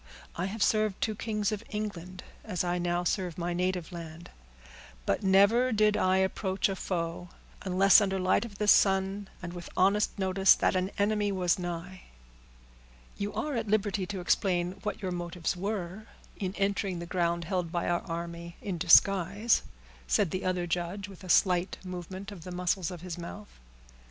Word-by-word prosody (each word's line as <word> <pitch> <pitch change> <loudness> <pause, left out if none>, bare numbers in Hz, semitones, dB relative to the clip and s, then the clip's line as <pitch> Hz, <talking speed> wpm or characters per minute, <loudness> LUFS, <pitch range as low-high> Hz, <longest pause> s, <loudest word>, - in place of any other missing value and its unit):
I 175 - -2
have 200 +2 -1
served 215 -3 +1
two 220 - 0
kings 210 -1 -2
of 215 0 -4
England, 185 -4 -5 0.2
as 185 -6 -2
I 175 0 -1
now 175 0 0
serve 180 -1 -1
my 175 0 -2
native 180 -1 -1
land; 170 -1 -9 0.7
but 100 - 0
never 200 +6 +4
did 215 -1 +3
I 185 0 +3
approach 190 +1 0
a 195 - -2
foe, 175 -1 -3 0.3
unless 195 +2 +5
under 195 -1 0
the 185 - -2
light 185 - +3
of 215 -4 -9
the 210 - -1
sun, 195 0 +3 0.2
and 175 0 -5
with 175 -1 -8
honest 200 +4 +3
notice 190 0 +4
that - - +1
an 185 +1 0
enemy 205 0 +1
was 180 -2 +1
nigh." 175 +1 -5 1.2
"You 205 0 -3
are 300 - -2
at 230 - -2
liberty 205 -2 0
to 195 -3 -4
explain 175 -1 +1
what 210 +1 -4
your 185 - -1
motives 175 -1 -3
were 195 +1 -4 0.3
in 190 -1 -4
entering 195 -2 0
the 170 - -5
ground 170 -1 0
held 180 -1 -2
by 175 0 -1
our 175 0 +1
army 170 0 -6
in 185 -4 -4
disguise," 195 +5 +4 0.5
said 165 - +2
the 185 - -3
other 180 -1 0
judge, 175 +4 -3
with 195 -1 -13
a 185 - -9
slight 180 0 +3
movement 185 +2 -7
of 180 -5 -10
the 180 - -8
muscles 180 0 -1
of 180 -3 -8
his 180 -1 -6
mouth. 200 +5 -9
185 Hz, 175 wpm, -29 LUFS, 175-200 Hz, 1.2 s, unless